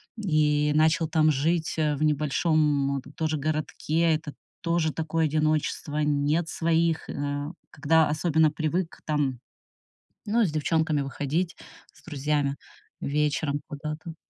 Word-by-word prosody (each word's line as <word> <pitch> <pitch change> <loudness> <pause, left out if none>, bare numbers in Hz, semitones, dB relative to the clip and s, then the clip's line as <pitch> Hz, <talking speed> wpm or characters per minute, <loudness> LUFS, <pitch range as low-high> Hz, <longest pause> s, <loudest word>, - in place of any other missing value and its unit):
и 150 -7 +2
начал 160 +1 +3
там 155 -1 +3
жить, 160 +4 0
э, 150 -1 +2
в 150 - -2
небольшом 150 -2 +1
тоже 155 -2 -1
городке. 155 +2 0
Это 155 -1 -4 0.3
тоже 170 -2 +1
такое 160 0 0
одиночество, 155 0 0
нет 150 +3 +1
своих, 165 0 0
а 145 +1 -3 0.2
когда 155 +1 +3
особенно 155 0 +2
привык 160 +3 -2
там, 145 -5 0 0.9
ну, 230 +2 +3
с 170 - 0
девчонками 155 0 +1
выходить, 145 +6 -2 0.4
с - - -22
друзьями, 145 -2 -1 0.5
вечером 145 0 0
куда-то. 155 +3 -6
155 Hz, 120 wpm, -26 LUFS, 145-160 Hz, 0.9 s, начал